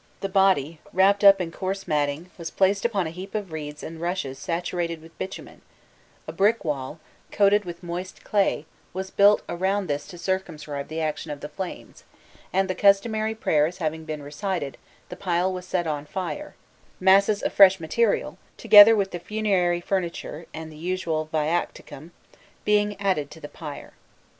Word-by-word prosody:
The 195 - -2
body, 190 -6 +2
wrapped 200 +2 +3
up 200 -1 +8
in 170 -2 -3
coarse 195 +2 -4
matting, 150 +3 -1
was 170 -2 -6
placed 195 +2 +1
upon 205 -6 +1
a 160 - -4
heap 190 +4 -9
of 205 -5 -3
reeds 150 -1 -6
and 160 0 -8
rushes 170 -7 -3
saturated 170 -1 -2
with 165 +1 -16
bitumen: 190 - -7 0.7
a - - -4
brick 210 +1 +2
wall, 145 0 -3 0.3
coated 205 0 +3
with 175 0 -8
moist 175 +2 -6
clay, 195 -7 +1 0.3
was 190 +1 -5
built 205 +1 +5
around 190 +3 -1
this 145 -3 -3
to 175 - -10
circumscribe 165 -6 -3
the 160 +1 -4
action 155 0 -3
of 145 -1 -6
the 150 - -5
flames, 190 -2 -8 0.5
and, 190 +1 +1
the 185 - -1
customary 215 +3 +2
prayers 160 -5 +1
having 160 -2 -3
been 155 -2 -6
recited, 150 0 -4 0.3
the - - -7
pile 180 0 0
was 180 0 -7
set 180 -2 -1
on 150 -2 -3
fire, 195 - -5 0.4
masses 195 +2 +4
of - - -1
fresh 190 -1 +7
material, 200 +7 0 0.2
together 210 +2 +9
with 195 -2 0
the 175 - -5
funerary 185 -3 0
furniture 170 -3 -3
and 160 0 -8
usual 160 -1 -2
viaticum, 155 -1 -2 0.6
being 210 -1 +2
added 185 -8 0
to 160 - -12
the 145 - -8
pyre. 150 -1 -9
180 Hz, 165 wpm, -25 LUFS, 160-195 Hz, 0.7 s, together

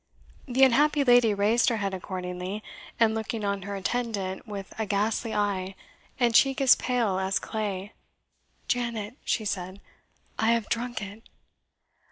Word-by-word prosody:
The 260 +1 +3
unhappy 285 +3 +4
lady 245 -3 +5
raised 215 +5 +3
her 230 - 0
head 200 -2 -2
accordingly, 185 +2 -5 0.4
and 225 -1 +4
looking 220 -1 -3
on 200 -1 -1
her 200 +2 -5
attendant 200 -2 -3
with 200 -2 -7
a 220 - -1
ghastly 215 +3 0
eye, 195 -2 -1 0.4
and 240 -2 +3
cheek 270 +4 +4
as 270 -2 +7
pale 230 -7 0
as 190 0 0
clay 205 -2 -4 0.7
"Janet," 235 -2 -2
she 220 - -1
said, 185 -1 -3 0.6
"I 225 +1 +4
have 230 -2 -1
drunk 240 -1 -2
it." 200 +3 -9
215 Hz, 145 wpm, -27 LUFS, 195-235 Hz, 0.7 s, as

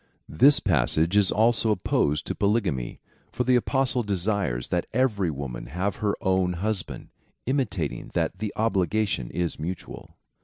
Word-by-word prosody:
This 140 - +5
passage 80 - +2
is 105 -2 +4
also 115 +1 +2
opposed 80 -7 +1
to - - -3
(jroXvyafiia) - - -18
polygamy. 100 - 0 0.3
For 125 - -1
the 125 +1 +3
Apostle 130 0 +1
desires 100 - -1
that 90 -1 -1
every 110 -7 +1
woman 70 -5 -6
have 90 +9 -2
her 105 -4 0
own 95 -1 +1
hus 100 +2 -1
band, - - -10 0.4
intimating 115 - -2
that 90 - -1
the 105 -1 -3
obligation 100 - 0
is 85 -2 -3
mutual. 85 +3 -7
100 Hz, 150 wpm, -25 LUFS, 85-110 Hz, 0.4 s, This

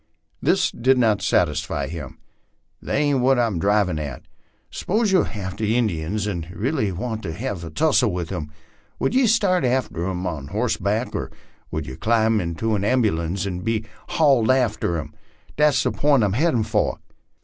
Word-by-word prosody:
This - - +2
did 130 +2 +2
not 110 -4 +2
satisfy 80 -4 0
him. 75 -6 -7 0.3
" - - -47
That - - -3
ain't 145 -2 +2
what 130 +1 +3
I'm 115 -7 +1
drivin' 100 -3 +2
at. 70 -4 -6 0.5
S'pose 215 +2 0
you're 185 - +3
after 100 0 -5
Injuns 105 -4 0
and 85 -5 -4
really 110 - -1
want 110 +5 -4
to 85 - -4
hev 85 +2 -4
a 85 - -6
tussle 130 - +2
with 90 -1 -4
'em, 75 -5 -5 0.5
would - - 0
ye 255 -1 +4
start 200 -5 +3
after 120 -9 0
'em 90 0 -3
on 75 -6 -4
hossback, - - -1
or - - -3 0.4
would 80 -1 -3
ye 65 - -7
climb 110 -1 +2
into 85 +6 -2
an 100 -2 0
ambulance 100 -6 +1
and 90 -2 -4
be 110 0 -1 0.2
haulded 135 -8 +3
after 110 -8 0
'em? 75 -1 -6 0.4
That's 145 -4 +3
the - - +1
pint 140 -5 +3
I'm 100 -2 +1
headin' 125 -2 +2
fur." 110 0 +1
105 Hz, 170 wpm, -22 LUFS, 90-125 Hz, 0.5 s, ye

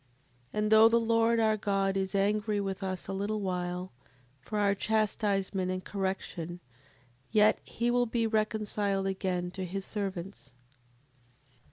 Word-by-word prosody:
7:33. 135 - -37 0.5
And 210 0 0
though 220 +1 +8
the 235 +1 +4
Lord, 230 0 +3
our 220 -1 +3
God, 195 -2 0
is 190 0 -1
angry 205 +1 +1
with 195 -1 -3
us 185 -2 -3
a 195 - -3
little 205 +2 -2
while, 180 -1 -3 0.5
for 210 +11 -5
our 200 -1 +3
chastisement 200 -3 0
and 185 0 -3
correction, 190 -3 -3 0.7
yet 215 0 +4
he 235 +1 -1
will 245 0 +2
be 230 0 0
reconciled 215 -2 0
again 185 -2 -2
to 190 +1 -5
his 190 +2 -4
servants. 195 - -5
200 Hz, 145 wpm, -30 LUFS, 190-215 Hz, 0.7 s, though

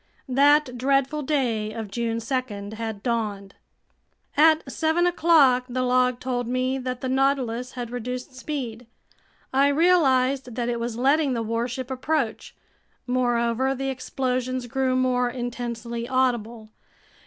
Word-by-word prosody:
That 280 -1 +3
dreadful 275 +3 +1
day 245 -7 0
of 220 -3 -6
June 230 0 -1
2 225 -4 -3
had 220 -2 -5
dawned. 210 -5 -2 0.8
At 315 +1 +4
seven 320 +2 +1
o'clock 315 -8 +4
the 255 +1 -1
log 250 0 +2
told 245 -2 -2
me 255 +2 0
that 255 -1 -4
the 260 - -2
Nautilus 260 -2 0
had 245 -2 -5
reduced 250 +2 -5
speed. 250 -4 -5 0.7
I 275 +1 +4
realized 275 -6 +3
that 240 -1 -1
it 235 -1 -1
was 230 -1 -3
letting 275 +2 +2
the 230 -2 -1
warship 240 +3 -3
approach. 260 -3 -2 0.5
Moreover, 245 +1 +1
the 270 +1 -3
explosions 255 -1 -2
grew 260 +1 0
more 250 -1 +2
intensely 240 -1 -5
audible. 240 -4 0
255 Hz, 130 wpm, -24 LUFS, 235-270 Hz, 0.8 s, At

